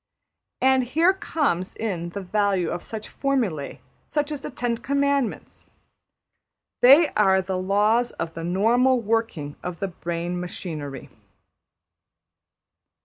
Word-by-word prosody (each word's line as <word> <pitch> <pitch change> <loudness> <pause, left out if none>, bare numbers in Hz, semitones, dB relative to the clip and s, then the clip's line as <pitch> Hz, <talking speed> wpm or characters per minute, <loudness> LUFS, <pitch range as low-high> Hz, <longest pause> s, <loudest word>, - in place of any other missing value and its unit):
And 265 0 +4
here 325 +9 +3
comes 280 - -1
in 180 -6 -3
the 200 +4 -6
value 195 -2 0
of 175 - -3
such 220 -1 -7
formul\ae{} 230 - -1 0.4
as 295 -1 0
the - - -5
Ten 240 -1 -2
Commandments. 280 -1 -1 1.1
They 285 +6 +8
are 190 -2 +3
the 190 -1 -2
laws 210 +6 +2
of 165 0 -5
the 165 - -6
\emph{normal} 230 +8 +2
working 215 -10 -1
of 180 -2 -6
the 195 - -2
brain 175 0 -4
machinery. 155 -6 -6
205 Hz, 115 wpm, -24 LUFS, 175-255 Hz, 1.1 s, They